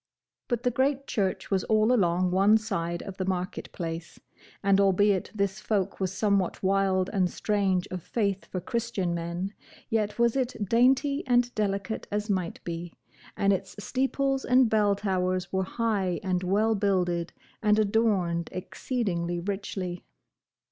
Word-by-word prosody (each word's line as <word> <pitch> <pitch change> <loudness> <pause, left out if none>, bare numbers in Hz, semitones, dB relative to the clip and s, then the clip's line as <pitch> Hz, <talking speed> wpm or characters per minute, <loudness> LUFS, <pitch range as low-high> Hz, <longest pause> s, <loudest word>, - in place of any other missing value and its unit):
But 240 -2 -1
the 250 - +2
great 275 +2 +1
church 195 -5 -2
was 190 -1 +2
all 215 +2 +3
along 180 -4 +2
one 200 +4 +5
side 170 -6 -3
of 195 - -8
the 185 - -2
market 185 -1 -3
place; 165 -1 -6 0.4
and 200 0 +4
albeit 195 0 +3
this 200 0 -1
folk 200 -3 -1
was 190 -2 -1
somewhat 200 -2 0
wild 190 -1 +2
and 185 -3 +2
strange 195 -4 0
of 185 -1 -4
faith 200 0 -1
for 185 - -4
Christian 205 -3 -2
men, 170 +4 -3 0.4
yet 215 -2 0
was 235 0 +3
it 260 -2 0
dainty 265 +6 +3
and 245 0 +3
delicate 200 0 -2
as 210 +1 -1
might 185 -3 -2
be, 170 0 -5 0.4
and 200 0 +3
its 190 -1 -4
steeples 270 +4 0
and 250 -2 +4
bell 210 -2 +3
towers 185 -2 -1
were 190 0 +1
high 200 -5 -1
and 185 -1 0
well 205 +5 +2
builded, 180 -4 0 0.3
and 210 -1 +4
adorned 200 -6 +1
exceeding 185 -1 -2 0.2
richly. 190 -3 -4
195 Hz, 150 wpm, -27 LUFS, 185-220 Hz, 0.4 s, one